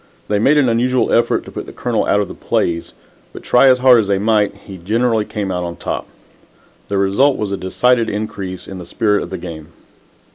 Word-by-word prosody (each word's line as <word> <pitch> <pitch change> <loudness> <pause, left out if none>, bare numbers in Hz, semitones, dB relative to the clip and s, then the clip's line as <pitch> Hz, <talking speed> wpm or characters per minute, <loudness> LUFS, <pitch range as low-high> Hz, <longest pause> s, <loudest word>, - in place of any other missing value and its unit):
They 105 - +1
made 140 +8 +3
an 140 -3 +4
unusual 125 +2 +1
effort 120 - +2
to - - -10
put - - -7
the - - -8
Colonel 120 -3 -2
out 105 - +3
of 100 - -3
the - - -8
plays, 85 -1 -2 0.4
but, - - -10
try 125 +2 +4
as 130 -1 +6
hard 125 -1 +6
as 105 - 0
they 100 -1 +1
might, 105 0 +1
he 95 -2 -12
generally 110 +4 0
came 100 -3 -4
out 90 -1 -2
on 85 -1 -5
top. - - -5 0.8
The 100 - -2
result 100 +9 +2
was 105 -2 -3
a - - 0
decided 115 +6 +1
increase 105 -3 -5
in 95 -1 -8
the 90 - -8
spirit 105 -1 +1
of - - -6
the 95 - -5
game. 80 -4 -8
105 Hz, 220 wpm, -17 LUFS, 95-120 Hz, 0.8 s, as